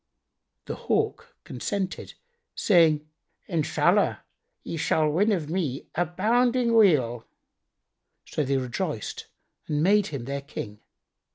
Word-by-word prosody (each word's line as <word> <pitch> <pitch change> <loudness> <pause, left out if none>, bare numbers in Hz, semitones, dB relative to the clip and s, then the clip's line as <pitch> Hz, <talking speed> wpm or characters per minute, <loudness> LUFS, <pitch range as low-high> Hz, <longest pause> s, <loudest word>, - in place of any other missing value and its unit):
The - - -4
Hawk - - -2
consented, 190 +9 -4 0.4
saying, 160 -6 +4 0.4
"Inshallah, 165 -5 +1 0.4
ye - - -5
shall 155 0 +1
win 190 +9 +2
of 170 -7 -1
me 155 -6 -3
abounding 235 +8 +1
weal." 140 - +3 1.0
So 150 - -2
they 135 0 +1
rejoiced 130 - -4 0.4
and 150 0 0
made 205 +2 +4
him 140 -6 -5
their 140 +1 -3
King. 105 -7 -7
160 Hz, 105 wpm, -26 LUFS, 140-195 Hz, 1.0 s, saying